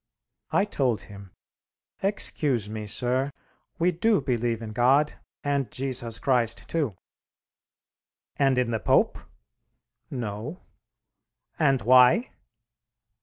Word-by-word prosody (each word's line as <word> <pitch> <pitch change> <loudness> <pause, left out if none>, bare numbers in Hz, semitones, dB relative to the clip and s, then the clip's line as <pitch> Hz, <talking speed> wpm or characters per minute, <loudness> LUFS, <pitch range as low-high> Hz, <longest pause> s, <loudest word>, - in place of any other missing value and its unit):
I 200 - +2
told 130 - 0
him, 100 -2 -12 0.7
"Excuse 145 - 0
me, 105 0 -6
sir. 125 +5 0 0.5
We 175 +2 +2
do 205 +5 +2
believe 120 -4 -1
in 110 - -6
God, 130 +6 +3 0.3
and 140 -2 0
Jesus 125 -4 -3
Christ, 120 -4 0
too." 145 - -1 1.4
"And 135 -2 +3
in 125 -2 +1
the 110 - -1
Pope?" - - +2 0.9
"No." 120 - -5 1.0
"And 135 -5 +3
why?" 125 - +5
125 Hz, 100 wpm, -26 LUFS, 115-145 Hz, 1.4 s, why